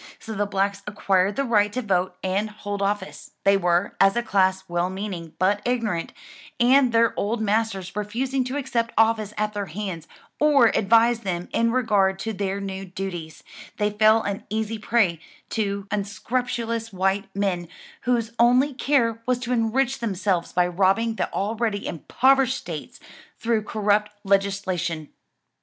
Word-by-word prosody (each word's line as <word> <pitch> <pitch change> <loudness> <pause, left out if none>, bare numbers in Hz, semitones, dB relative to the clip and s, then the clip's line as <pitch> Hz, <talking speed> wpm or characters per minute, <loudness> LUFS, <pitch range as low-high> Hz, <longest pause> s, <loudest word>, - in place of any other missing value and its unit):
So 220 - -8
the 205 -1 -1
blacks 200 0 -1
acquired 200 -1 +1
the 275 - 0
right 210 -5 +2
to 255 - -1
vote 185 -3 0
and 195 +3 0
hold 205 -1 -5
office: 200 -1 -3
they 200 0 +5
were, 175 0 +1
as 195 +2 +5
a 240 - 0
class, 190 -3 +2
well 175 +1 0
meaning, 185 -4 -6
but 200 +3 +2
ignorant, 230 -9 -1 0.5
and 255 +1 +5
their 230 0 +3
old 220 +3 -1
masters 215 -4 -1
refusing 255 +6 -1
to 260 +3 -3
accept 235 -4 -2
office 220 -2 +3
at 210 0 -1
their 205 -1 -3
hands, 180 -1 -5 0.3
or 285 -6 +5
advise 230 +3 +3
them 180 -5 -4
in 230 0 +2
regard 205 -6 +2
to 220 +3 -4
their 195 0 -2
new 195 -1 -5
duties, 180 -4 -6 0.3
they 210 0 +1
fell 215 +2 +4
an 200 -1 -3
easy 220 +1 -2
prey 210 -7 +1 0.3
to 200 -3 -2
unscrupulous 230 +2 -2
white 195 +1 0
men, 190 -4 -1 0.3
whose 235 -2 0
only 250 +4 +4
care 240 -4 +1
was 250 -1 +2
to 250 0 -3
enrich 245 +3 +1
themselves 195 -6 -1
by 180 0 +2
robbing 195 +6 +2
the - - -2
already 215 0 -1
impoverished 265 - +2
states, - - -8 0.4
through 230 -2 0
corrupt 210 0 +1
legislation. 190 -5 0
210 Hz, 150 wpm, -24 LUFS, 195-230 Hz, 0.5 s, they